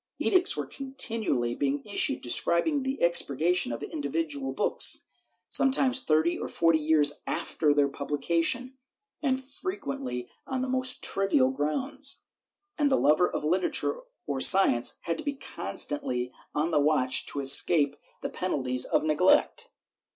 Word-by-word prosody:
Edicts 370 +2 +2
were - - -3
continually 225 - -3
being 140 +2 -3
issued 215 +6 +1
prescribing 170 - 0
the 265 +1 -4
expurgation 170 -2 +2
of 115 - -6
individual 145 -2 -4
books, 135 - +2 0.4
sometimes 265 -1 +4
thirty 160 -3 0
or - - -6
forty 165 -1 +1
years 150 -2 +1
after 150 -2 -1
their 145 -1 +2
pubhcation, 165 - -2 0.5
and 265 -3 -1
frequently 275 - -6 0.2
on 260 -1 -3
the - - -3
most 255 0 -1
trivial 165 -10 +2
grounds, 265 - -2 0.6
and 290 -1 +2
the - - +4
lover 155 +5 +2
of - - -5
literature 180 - 0 0.3
or 135 -2 -4
science 130 -11 +5
had 165 -1 -4
to - - -7
be 285 -1 -3
constantly 125 - -4 0.2
on 155 +3 -1
the 155 - +2
watch 145 -3 +1
to 145 - -3
escape 140 +1 +4 0.3
the - - -4
penalties 130 -8 -1
of - - 0
neglect. 180 - +1
165 Hz, 135 wpm, -27 LUFS, -, 0.6 s, science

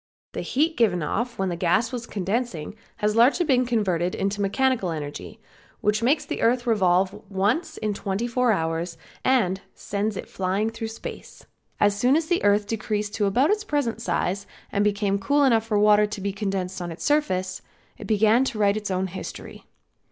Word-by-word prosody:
The - - -4
heat 315 +5 0
given 180 -8 +2
off 235 +9 -2
when 190 -1 0
the 175 - -2
gas 180 +7 +1
was 240 -2 -5
condensing 200 -4 -2 0.2
has 210 -1 0
been 215 - -3
largely 260 +1 +4
converted 185 -7 0
into 200 +1 -1
mechanical 230 0 +1
energy 150 -3 -6 0.4
which 210 +1 +1
makes 280 +6 +2
the - - -4
earth 240 +2 +2
revolve 190 -4 +2 0.2
once 225 - 0
in 215 -1 -1
twenty 200 +3 -2
four 245 0 +2
hours 165 -2 -1 0.3
and 195 -8 +2
sends 205 0 -2
it - - -6
flying 195 +4 -1
through 225 0 -5
space. 225 - -9 0.3
As 205 -1 +3
soon 250 +6 +3
as 320 0 +1
the 345 +2 0
earth 205 0 +3
decreased 210 -1 -2
to 205 -2 +1
about 255 - +3
its 420 0 0
present 290 - -1
size 185 +2 -1 0.2
and 200 - +1
became 200 -1 +1
cool 285 +8 +2
enough 225 -4 +3
for 215 -2 +1
water 210 0 +5
to 210 - -6
be 200 0 -2
condensed 190 -2 -3
on 175 -1 -4
its 165 - -8
surface, 185 -12 0 0.4
it - - -8
began 220 +3 +4
to 235 - -3
write 205 0 +3
its 210 -1 -4
own 185 0 0
history. 185 0 -8
210 Hz, 185 wpm, -24 LUFS, 190-240 Hz, 0.4 s, water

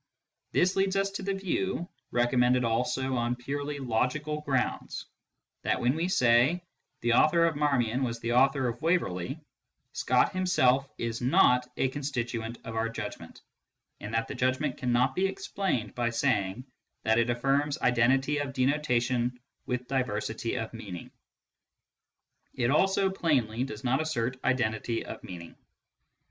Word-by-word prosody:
This 185 +1 +2
leads 195 0 +1
us 195 0 +1
to 195 - -5
the 195 0 -1
view 190 -2 -2 0.2
(recommended 125 +1 +3
also 125 +3 0
on 120 0 0
purely 145 +4 -4
logical 140 +5 -1
grounds) 135 -4 -2 0.6
that - - 0
when 125 +1 +2
we 165 +2 0
say 130 +2 +3 0.2
" - - -51
the 120 0 +2
author 165 +6 +5
of 165 -2 +1
Marmion 135 -4 +1
was 115 -2 -2
the 115 +1 -2
author 135 +1 +3
of 120 0 -4
Waverley," 140 - 0 0.5
Scott - - +2
himself 140 -8 +2
is 115 -1 -3
not 125 0 +4
a - - +2
constituent 120 -5 -3
of 115 0 -7
our 115 +1 0
judgment, 105 -7 -7 0.6
and 105 - -7
that 115 0 0
the - - -5
judgment 130 +2 0
cannot 125 +1 +2
be 190 +1 +1
explained 190 - -2
by 120 -1 0
saying 115 -2 0 0.4
that 110 +1 +3
it 115 +1 +1
affirms 135 +4 +1
identity 130 +4 +3
of 140 -1 -3
denotation 125 -3 +1 0.3
with 125 0 -2
diversity 115 -3 -2
of 110 0 -4
meaning. 100 -6 -8 1.4
It 120 +1 +1
also, 190 +4 +3
plainly, 130 - 0
does 110 -5 -8
not 130 +3 +2
assert 125 -5 -2
identity 115 -2 0
of - - -8
meaning. 85 -2 -9
125 Hz, 145 wpm, -29 LUFS, 115-145 Hz, 1.4 s, author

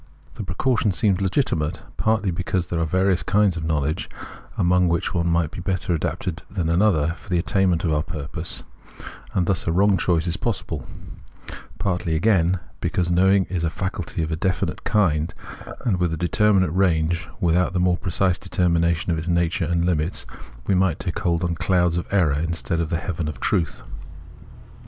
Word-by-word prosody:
The - - -7
precaution 105 +5 +1
seems 100 -1 +1
legitimate, 90 - 0
partly 110 -3 +1
because 90 +1 -2
there 85 - -1
are 85 - +1
various 95 +2 +2
kinds 100 -2 +2
of 85 - -4
knowledge, 80 +1 -1 0.5
among 90 +1 +3
which 85 +2 0
one 85 -2 0
might 85 -2 +1
be - - -7
better 90 0 -1
adapted 80 +1 -3
than 90 -4 -2
another 85 -3 +3
for - - -16
the 90 - +2
attainment 90 -1 +1
of 80 -3 +1
our 75 - +2
purpose, 80 +2 -5 0.3
— - - -13
and 90 - +2
thus 95 -1 0
a - - +2
wrong 100 +3 +4
choice 85 -1 +1
is 85 0 0
possible: 90 - -3 0.9
partly, 90 -4 -1
again, 90 -1 +3 0.2
because 90 -1 0
knowing 95 +2 +4
is 90 -3 -3
a 80 - +1
faculty 95 -1 -3
of 80 - -3
a - - 0
definite 90 +3 -1
kind 80 -6 +1 0.5
and 100 -7 +1
with 90 -2 +1
a 80 - -2
determinate 95 +1 +2
range, 85 -2 +1
without 90 -1 +2
the 90 - +1
more 90 0 +2
precise 90 +1 +1
deter 95 -1 -1
mination 85 0 +1
of 80 -2 +1
its 80 - -6
nature 85 0 +1
and 85 +1 0
limits 85 -1 -1 0.4
we - - +1
might 95 -4 +2
take 90 -3 -4
hold 85 0 0
on 85 -1 0
clouds 90 0 +1
of 85 - -2
error 80 -8 +2
instead 85 +1 -1
of 85 -2 -1
the 85 - 0
heaven 85 -2 -3
of 75 - -5
truth. 85 -3 -1
85 Hz, 185 wpm, -23 LUFS, 80-95 Hz, 0.9 s, wrong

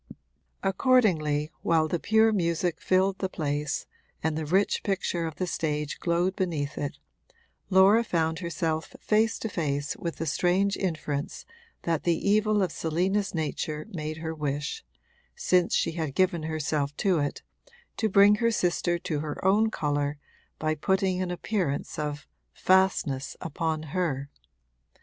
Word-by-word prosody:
Accordingly, 185 - +2
while 160 -1 +2
the 170 +2 -1
pure 220 +1 +4
music 170 -3 0
filled 190 +1 +2
the 190 - -1
place 145 -3 -2 0.4
and 160 0 0
the 155 -1 -3
rich 190 +5 +2
picture 180 -4 -1
of 160 - -6
the 185 - -2
stage 150 -4 -2
glowed 175 +2 +1
beneath 155 -6 -2
it, 145 -1 -4 0.7
Laura 195 +4 +6
found 165 -5 0
herself 165 -2 -2
face 220 +1 +2
to - - -3
face 145 -6 -2
with 170 -1 -4
the 165 - -4
strange 180 +6 +2
inference 155 -5 -3 0.4
that 165 -2 0
the 170 -2 +1
evil 210 0 +3
of 185 - -1
Selina's 185 +5 0
nature 155 0 -3
made 155 -2 -4
her 160 0 -4
wish 150 -1 -3 0.5
since 180 -1 +2
she - - +1
had 160 -4 -4
given 185 -3 +2
herself 150 -2 -2
to 190 -5 +2
it 145 -1 -2 0.5
to 220 - +1
bring 200 +1 +6
her 230 +1 +2
sister 175 -4 +1
to 160 -3 -3
her 150 +3 -5
own 210 +4 +4
colour 145 -5 -1 0.4
by 155 0 0
putting 190 +3 +1
an 185 - -2
appearance 175 -6 -2
of 150 -1 -3 0.3
'fastness' 185 -8 +2
upon 160 -1 -2
her. 145 -6 -1
170 Hz, 145 wpm, -27 LUFS, 150-190 Hz, 0.7 s, Laura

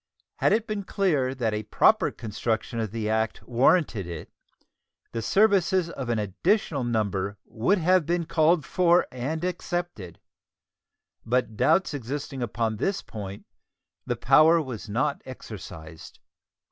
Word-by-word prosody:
Had - - +2
it 220 +1 +2
been 210 -2 -3
clear 150 -10 0
that 115 -4 -1
a 105 - -1
proper 110 - +3
construction 115 +2 -3
of 110 -2 -2
the 110 +1 -3
act 110 0 -1
warranted 125 - +2
it, 85 -3 -8 0.8
the 115 - -3
services 190 - +3
of 130 -6 -6
an 115 - +1
additional 140 - 0
number 100 -4 -1
would 125 - +1
have 180 -1 +3
been 170 0 0
called 160 -1 +2
for 175 -1 +3
and 140 +6 -4
accepted; 175 - -4 1.0
but 120 -1 0
doubts 150 - +2
existing 140 +1 -5
upon 115 -1 -1
this 195 - -1
point, 100 -2 -8 0.6
the 120 - 0
power 155 +8 +5
was 125 -8 -6
not 135 +7 -1
exercised. 80 -10 -10
130 Hz, 135 wpm, -26 LUFS, 110-170 Hz, 1.0 s, power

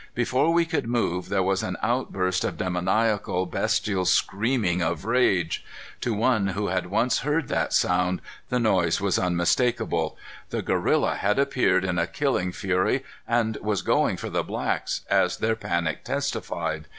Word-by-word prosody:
Before 130 +6 +2
we 170 0 +3
could 160 -7 -2
move, 100 -7 -1
there 95 -2 +1
was 95 +1 +1
an 90 - -3
outburst 95 -6 0
of - - -2
demoniacal, 95 +1 0
bestial 105 -3 0
screamings 100 -1 +1
of 85 +1 -2
rage. 105 -8 +1 0.4
To 115 - -1
one 110 -2 +2
who 100 +1 -2
had 90 0 -1
once 115 +6 +1
heard 150 +1 -1
that - - 0
sound, 90 0 +2 0.3
the 125 - +1
noise 95 -8 +2
was 100 -2 +1
unmistakable. 100 +7 +1 0.3
The - - -3
gorilla - - +1
had 105 +1 +1
appeared 125 -9 +2
in 90 -2 0
a 85 - +1
killing 135 -10 0
fury 90 0 0 0.2
and 115 -2 +1
was 105 -3 -2
going - - +2
for - - -6
the - - +1
blacks, - - -2
as - - +2
their 110 0 +1
panic 85 -7 -2
testified. 80 -3 -3
100 Hz, 155 wpm, -25 LUFS, 90-120 Hz, 0.4 s, we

